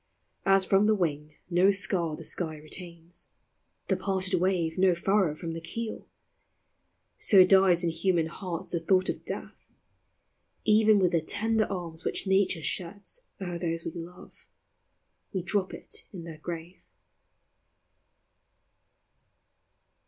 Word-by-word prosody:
As 195 0 +5
from 195 +2 +4
the 215 - +4
wing 150 -5 -2
no 180 +2 +4
scar 185 -5 0
the - - -10
sky 160 -3 -3
retains, 170 +2 -7 0.6
The - - +2
parted 190 -1 -1
wave 180 -3 +1
no 185 -2 +5
furrow 190 -2 +2
from 165 +1 -5
the 165 - -6
keel, 225 +7 -5 1.1
So 190 -3 +7
dies 190 -2 +5
in 170 - +1
human 170 0 +1
hearts 170 +1 -5
the 170 - 0
thought 185 +3 +2
of - - -3
death: - - -6 1.1
Even 215 0 +5
with 185 -3 +3
the 165 -2 +2
tender 220 +6 +1
tears 170 -4 -4
which - - -1
Nature 190 -4 +2
sheds 200 - -3
O'er 175 -3 -4
those 165 -1 -2
we - - -3
love, 175 +1 -11 0.9
we 190 -3 -2
drop 190 0 0
it - - -6
in 180 -4 -8
their 165 -2 -9
grave. 170 +2 -7
180 Hz, 130 wpm, -28 LUFS, 165-195 Hz, 1.1 s, So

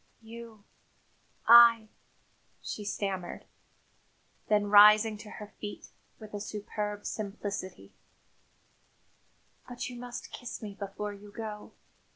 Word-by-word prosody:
"You 225 -2 -11 0.8
I 230 -1 +8 0.4
" - - -39
she 210 - -5
stammered. 195 -3 -4 1.0
Then 210 -1 +3
rising 210 +1 +7
to 210 0 -10
her 210 - -8
feet, 205 -1 -7 0.3
with 215 -1 -12
a 205 - -4
superb 210 0 -5
simplicity: 200 - -5 1.8
"But, 245 0 -5
you 245 - -9
must 245 0 -8
kiss 245 -2 -7
me 210 -2 -7
before 205 +1 -5
you 205 0 -13
go. 210 -1 -7
210 Hz, 110 wpm, -30 LUFS, 205-225 Hz, 1.8 s, I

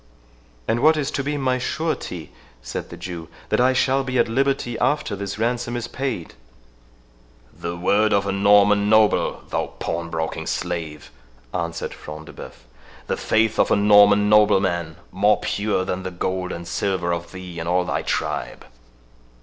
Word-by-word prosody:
"And 115 - +1
what 155 +4 +5
is 145 -1 -1
to 140 - -2
be 145 +1 -2
my 130 -2 0
surety," 125 - -3 0.3
said - - -5
the - - -9
Jew, 85 -3 -7 0.2
"that - - +2
I 130 +1 +4
shall 135 +1 +2
be 130 -1 -2
at 120 - +3
liberty 130 0 0
after 145 -8 0
this 100 0 -5
ransom 120 +1 -1
is 120 0 -4
paid?" 130 -11 -4 1.2
"The 85 0 -5
word 100 +5 +2
of 100 0 +2
a 100 - -1
Norman 100 +1 +4
noble, 110 -1 +3
thou - - -1
pawn 85 0 -3
broking 80 0 -3
slave," 85 -4 -4 0.4
answered 85 -1 -3
Front 75 +1 -9
de - - -12
Bœuf; - - -11 0.4
"the - - -1
faith 110 0 +1
of - - +4
a - - +4
Norman 105 0 +6
nobleman, 95 -6 +3 0.2
more 105 +3 +3
pure 100 -2 -1
than 95 0 -3
the 95 - -4
gold 90 +1 -3
and 85 0 -6
silver 90 -3 -1
of 85 0 -5
thee 90 -2 -8
and 85 +1 -3
all 90 0 +2
thy 90 - -1
tribe." - - -3
100 Hz, 165 wpm, -22 LUFS, 85-120 Hz, 1.2 s, Norman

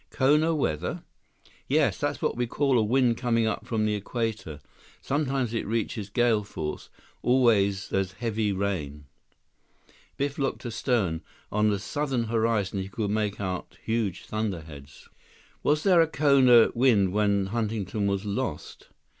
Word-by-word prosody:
"Kona 150 +5 +3
weather?" 80 - -2 0.6
"Yes, - - +2
that's - - -2
what - - 0
we 120 0 -1
call 135 0 +2
a - - +2
wind 120 +1 +2
coming 115 -2 +1
up 110 - -3
from 110 -2 0
the 105 - +1
Equator. 105 - -3 0.4
Sometimes 135 -4 -1
it 115 - -2
reaches 110 -2 -2
gale 115 -1 +2
force. 80 -6 -6 0.3
Always 105 -6 +2
there's 95 -1 -1
heavy 110 0 -1
rain." 85 -8 -3 1.1
Biff 140 +1 -2
looked 135 -1 -2
astern. 110 -8 -1 0.3
On 105 0 +2
the 100 - +1
southern 130 +4 -2
horizon, 110 -3 0
he 95 - -6
could 105 +1 -3
make 105 -1 -1
out 95 -2 -4
huge 110 -5 -2
thunderheads. 80 -10 -6 0.5
"Was 150 +1 +1
there 180 -4 +5
a 165 - +3
Kona 135 -6 +5
wind 115 -7 +3
when 100 -2 +2
Huntington 105 -1 -2
was 100 0 -1
lost?" 100 -1 -4
110 Hz, 140 wpm, -27 LUFS, 100-125 Hz, 1.1 s, there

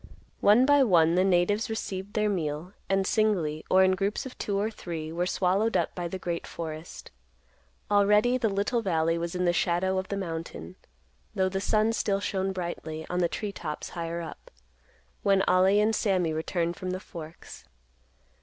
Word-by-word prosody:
One 220 +5 +5
by 285 0 +5
one 170 -9 +4
the 180 +1 +3
natives 195 +4 +2
received 205 -2 -4
their 215 0 +2
meal, 165 -2 -2 0.2
and, 195 0 +2
singly, 180 -9 +1
or 190 0 +6
in 190 - +4
groups 195 +5 -1
of 260 - -8
two 200 -1 -1
or 215 +2 -1
three, 165 -6 -6
were 175 +2 -1
swallowed 195 +5 +1
up - - -1
by 175 -1 -4
the 190 - -5
great 170 -2 -4
forest. 160 0 -7 0.8
Already 210 +4 +4
the 225 - +1
little 205 +4 0
valley 165 -4 +1
was 170 +1 -4
in 180 0 0
the 175 - +3
shadow 185 +2 +1
of 190 - -5
the 200 - -3
mountain, 165 - -6 0.6
though 190 0 +2
the 190 +1 -2
sun 215 +2 +2
still 200 -3 0
shone 195 -1 -1
brightly 170 -3 -5
on 180 - 0
the 175 -1 +2
tree 205 +6 -4
tops 155 -5 -6
higher 170 0 -4
up, 165 - -9 0.7
when 195 -1 +3
Ollie 190 +3 +4
and 215 +1 +3
Sammy 185 -7 +1
returned 170 +2 -2
from 185 - -5
the 185 0 -2
Forks. 165 -3 -11
185 Hz, 180 wpm, -27 LUFS, 170-205 Hz, 0.8 s, or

